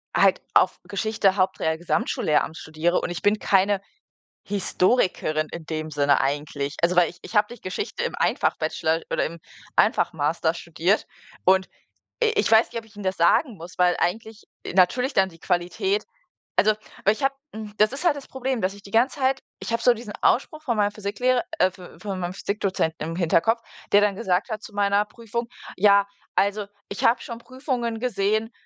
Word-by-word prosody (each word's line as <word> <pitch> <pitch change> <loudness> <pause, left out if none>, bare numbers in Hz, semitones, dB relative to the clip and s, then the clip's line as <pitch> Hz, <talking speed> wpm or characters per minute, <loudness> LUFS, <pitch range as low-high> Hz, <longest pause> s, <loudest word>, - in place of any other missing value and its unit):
halt - - +4
auf - - +4
Geschichte 200 -1 0
Haupt, 190 0 +1
Real, 160 0 +1
Gesamtschullehramt 160 -2 0
studiere. 160 +3 0
Und - - -3
ich 175 - -5
bin 205 +1 +2
keine 195 0 +2 0.7
Historikerin 185 -5 +1
in 170 - -7
dem 155 0 -4
Sinne 145 -1 +3
eigentlich. 140 0 -2
Also, 170 +1 +3
weil 175 -2 +5
ich 175 - -12
ich 220 - -7
habe 210 +3 +3
nicht 240 - -12
Geschichte 185 - -4
im 485 - -3
Ein-Fach-Bachelor 160 +1 0
oder - - +1
im 170 +1 -5 0.4
Ein-Fach-Master 160 +1 +2
studiert. 170 +3 0 0.4
Und 190 0 +4 0.6
i 445 - +4
ich - - +2
weiß 225 +1 +5
nicht, - - -3
ob 230 - -7
ich 215 - -22
ihm 205 - -7
das 190 0 0
sagen 205 - +3
muss, 170 0 -11
weil 180 -1 +4
eigentlich 220 +4 -2 0.2
i - - -5
natürlich 250 +9 +3
dann 190 0 +4
die 165 -3 -16
Qualität 185 - 0 0.5
also, 215 - +5 0.3
weil 210 - +5
ich 215 - -10
habe 275 0 +2 0.2
hm, 215 -1 -7
das 215 +2 +5
ist 275 +7 -6
halt 330 -4 +4
das 285 - -9
Problem, 260 -2 -2
dass 185 +1 0
ich 200 - -13
die 200 - -13
ganze 250 +6 +2
Zeit 265 0 +1 0.2
ich - - -6
habe 230 - 0
so 245 - +6
diesen 225 -2 -8
Ausspruch 305 +4 +2
von 240 -7 -1
meinem 205 -1 +2
Physiklehrer 215 +5 0 0.2
äh, 185 - +4
v 180 -1 -13
von 195 -3 -4
meinem 175 0 -3
Physikdozenten 195 -5 -1
im 165 - -4
Hinterkopf, 185 +6 +2 0.3
der 205 - +7
dann 205 -1 +2
gesagt 190 -1 0
hat 215 -2 -4
zu 215 - -10
meiner 205 0 +2
Prüfung: 235 +2 -5 0.3
„Ja, 200 0 +5 0.3
also, 200 +1 +1 0.2
ich 200 - -5
habe 235 +1 +4
schon 235 -1 -7
Prüfungen 250 -3 -3
gesehen, 220 -1 0
200 Hz, 190 wpm, -24 LUFS, 175-230 Hz, 0.7 s, der